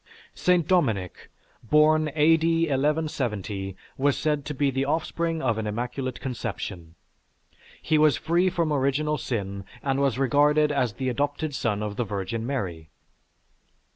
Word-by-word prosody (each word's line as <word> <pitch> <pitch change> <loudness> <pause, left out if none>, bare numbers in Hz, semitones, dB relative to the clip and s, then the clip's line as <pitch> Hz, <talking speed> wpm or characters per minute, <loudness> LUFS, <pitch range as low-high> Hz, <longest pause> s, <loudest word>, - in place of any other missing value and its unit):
St. 180 -3 +2
Dominic, 115 - 0 0.3
born 155 +4 +4
A.D. 165 +2 +4
1170, 130 - -1 0.2
was 140 0 +2
said 150 -2 -1
to 150 - -4
be 140 0 +1
the 135 +1 0
offspring 165 +2 -1
of 115 -4 +1
an 110 - -3
immaculate 125 +4 -3
conception. 100 -9 -5 0.8
He 155 -1 +1
was 150 -3 +4
free 175 +3 +2
from 165 -3 0
original 145 +2 0
sin 100 -4 -3 0.2
and 135 -1 0
was 135 -3 +1
regarded 145 +3 +3
as 125 -6 0
the 130 +2 -2
adopted 145 +4 -2
son 105 -5 -1
of 105 -1 -4
the - - +1
Virgin 105 +2 -4
Mary. 90 - -4
135 Hz, 140 wpm, -26 LUFS, 110-155 Hz, 0.8 s, born